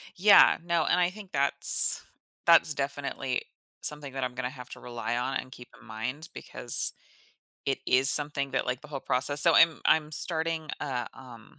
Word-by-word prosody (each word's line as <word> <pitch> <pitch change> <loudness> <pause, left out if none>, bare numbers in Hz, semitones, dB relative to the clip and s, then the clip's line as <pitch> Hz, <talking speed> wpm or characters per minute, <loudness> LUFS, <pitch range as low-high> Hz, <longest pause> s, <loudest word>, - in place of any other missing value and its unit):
Yeah, 200 +3 +6
no, 170 -1 0
and 180 - +1
I 175 -1 +2
think 195 0 -13
that's 140 0 +3 0.4
that's 165 -2 +5
definitely 135 -2 -4 0.4
something 145 -3 -4
that 135 -1 -4
I'm 125 -1 -3
gonna 125 0 -3
have 125 -2 -12
to - - -10
rely 120 -1 -5
on 130 +2 -2
and 130 - -8
keep 125 -2 -13
in - - -19
mind 125 +9 -6
because - - 0 0.7
it 135 - 0
is 130 +1 +4
something 145 -2 0
that, 135 - -1
like, 125 0 -3
the 150 - -13
whole 140 -2 -6
process 140 +3 0
so 170 - +5
I'm 165 -2 +4
I'm 155 -1 +2
starting 160 0 0
uh, 125 -4 -4
um, 120 -4 -15
140 Hz, 180 wpm, -27 LUFS, 125-160 Hz, 0.7 s, Yeah